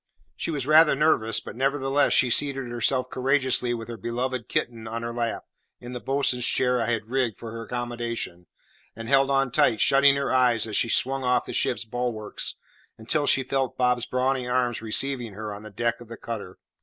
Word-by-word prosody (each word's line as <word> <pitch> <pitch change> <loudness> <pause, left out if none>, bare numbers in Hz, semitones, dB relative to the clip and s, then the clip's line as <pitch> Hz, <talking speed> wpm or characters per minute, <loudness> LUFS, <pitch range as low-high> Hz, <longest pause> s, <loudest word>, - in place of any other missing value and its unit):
She - - -4
was 145 -5 -2
rather 155 0 +6
nervous; 135 -7 +2
but, - - -10
nevertheless, 135 +2 +1
she 125 - +3
seated 135 0 +1
herself 125 +2 -1
courageously 130 -2 +1
with 115 -1 -7
her 120 -1 -7
beloved 120 +3 -3
kitten 115 -2 -2
in 115 +1 -5
her 115 0 -4
lap, 120 -1 -2 0.4
in 120 - -9
the 125 - -5
bo'sun's 135 -2 0
chair 125 -1 +2
I 115 - -1
had 115 -1 -2
rigged 130 -5 0
for 115 - -8
her 115 0 -7
accommodation, 120 -7 -4 0.5
and 115 0 -8
held 135 +1 +3
on 135 -2 +1
tight, 110 -2 +3
shutting 140 0 +5
her 140 -1 -1
eyes 125 -3 +3
as 110 -2 -4
she 115 - +2
swung 135 +3 +1
off 125 0 +1
the - - -7
ship's - - 0
bulwarks, 115 -2 -3 0.4
until 145 +6 -1
she 135 - +3
felt 135 -1 -2
Bob's 125 -1 +1
brawny 130 0 0
arms 125 -2 0
receive 135 +5 -1 0.2
her 105 0 -5
on 100 - -8
the 110 - -10
deck 120 +3 -2
of 120 - -11
the 115 0 -9
cutter. 105 -6 -7
125 Hz, 195 wpm, -25 LUFS, 115-135 Hz, 0.5 s, rather